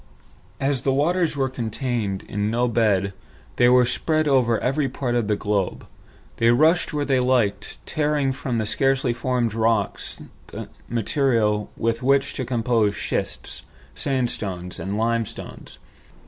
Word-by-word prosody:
As 135 -2 0
the 135 - +1
waters 160 +3 +1
were 135 -1 +1
contained 115 -5 -3
in 105 +1 -2
no 120 +2 +1
bed, 105 -4 +1 0.4
and 120 0 +5
were 125 0 +6
spread 155 +5 0
over 125 -5 +3
every 135 +2 0
part 125 -1 -2
of 120 -3 +1
the 105 - +2
globe, 100 -2 -1 0.5
they 115 - +3
rushed 155 +8 +4
where 145 -2 -1
they 135 -2 +2
liked, 115 -6 +1
tearing 150 -3 0
from 130 -3 -3
the 110 - 0
scarcely 135 +2 +1
formed 120 -1 -1
rocks 110 -2 0 0.7
material 115 -3 +1
with 115 0 0
which 140 +2 +2
to 130 - -3
compose 115 -4 +1
schists, - - -4 0.3
sandstones, 105 -9 -2
and 100 +2 -3
limestones. 115 -1 -3
120 Hz, 135 wpm, -23 LUFS, 110-135 Hz, 0.7 s, were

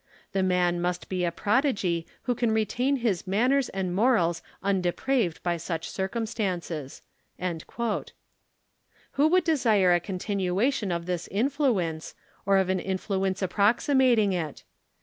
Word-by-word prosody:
The 195 - 0
man 180 -2 +1
must 175 0 -2
be 185 -1 -1
a 170 - +1
prodigy 200 - 0 0.2
who 250 - 0
can 235 -1 0
retain 245 +5 +1
his 220 -8 -1
manners 250 +8 +2
and 190 -2 -3
morals 185 -6 +2 0.2
undepraved 195 +1 0
by 175 -1 0
such 165 0 -4
circumstances." 190 - -3 0.4
Who 210 - -4
would 365 +2 +3
desire 225 - +3
a 175 - +4
continuation 195 +4 -1
of 170 -1 -2
this 175 -1 -3
influence, 215 - 0 0.3
or 195 0 +5
of 190 -1 +2
an 190 0 +1
influence 190 0 -2
approximating 220 +3 +3
it? 160 -5 -4
195 Hz, 125 wpm, -27 LUFS, 180-235 Hz, 0.4 s, or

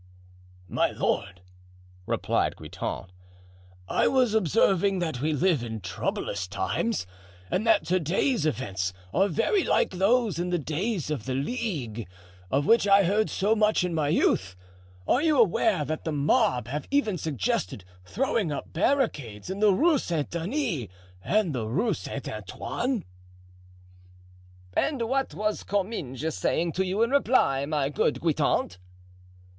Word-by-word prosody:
"My - - +1
lord," 90 0 -2 0.6
replied - - 0
Guitant, 95 - -6 0.8
"I - - +2
was 255 -4 +3
observing 195 -1 +3
that 160 -8 -2
we 155 +2 +1
live 155 -1 +2
in 110 -2 -5
troublous 95 +1 -3
times 100 - -1 0.5
and 215 +5 0
that 215 -8 +4
to 185 +3 +2
day's 175 - +1
events 95 -10 -2 0.2
are 195 +3 +3
very 230 - +1
like - - +2
those 200 +1 +2
in 175 +1 -1
the 175 - +1
days 160 - -2
of 140 -8 -3
the 130 - -1
Ligue, 135 - -3 0.4
of 140 +5 +1
which 230 +1 +4
I 200 0 +6
heard 205 +4 +1
so 210 +3 +1
much 210 -3 +3
in 180 -1 -1
my 155 -3 0
youth. 95 - +1 0.5
Are 255 - +3
you 310 -2 +3
aware 200 -5 +3
that 155 +3 -4
the 160 - -2
mob 150 - +2
have 145 +2 -4
even 220 - +1
suggested 105 - -2 0.2
throwing 225 - -1
up 145 - -6
barricades 165 - 0
in 195 - -4
the 210 -1 +5
Rue 300 - +3
Saint 160 -4 -2
Denis 170 - -2 0.4
and 205 -6 +1
the 115 -4 -2
Rue 205 - +1
Saint 140 -4 -6
Antoine?" 190 - -3 1.7
"And 275 -6 +1
what 265 +3 -1
was 215 0 -1
Comminges 160 - -2
saying 170 +1 0
to 190 +4 0
you 195 +5 +1
in 230 - 0
reply, 225 - +3
my 145 -3 0
good 145 - 0
Guitant?" 145 - 0
175 Hz, 145 wpm, -27 LUFS, 140-220 Hz, 1.7 s, I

